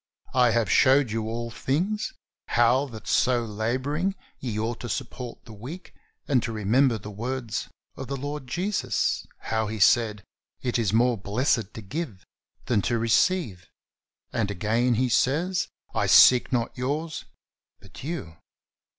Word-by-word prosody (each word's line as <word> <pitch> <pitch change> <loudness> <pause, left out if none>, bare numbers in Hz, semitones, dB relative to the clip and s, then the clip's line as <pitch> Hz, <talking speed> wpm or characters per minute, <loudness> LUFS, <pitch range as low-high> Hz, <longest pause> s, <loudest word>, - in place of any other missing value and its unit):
I 125 -1 +5
have 115 -1 +2
showed 130 -2 +5
you 110 0 -2
all 115 +1 -4
things, 180 - -1 0.3
how 120 +4 +3
that 110 -4 -10
so 125 -2 +2
laboring 130 - -1 0.2
ye 115 -5 -4
ought 115 +2 -2
to 120 - -6
support 120 +3 -5
the 115 - -11
weak 135 - -9 0.3
and 135 -5 +3
to 115 - -3
remember 115 +4 +2
the 105 0 -9
words 120 +2 -4 0.3
of - - -7
the 140 - -3
Lord 145 0 -5
Jesus, 185 +9 -1
how 110 -1 -1
He 110 +1 -4
said. 105 0 +3 0.4
It 125 -1 0
is 110 -4 +1
more 120 0 +3
blessed 110 +1 0
to 110 - -7
give 120 - -5 0.4
than 115 -5 +2
to 120 - 0
receive." 115 - +1 0.6
And 105 -2 0
again 110 +5 +1
he 125 +3 +2
says: 165 +9 +1 0.3
"I - - +1
seek 125 -1 +7
not 120 -2 -1
yours 150 +6 -3 0.5
but - - -13
you." 145 - -5
120 Hz, 150 wpm, -26 LUFS, 110-135 Hz, 0.6 s, seek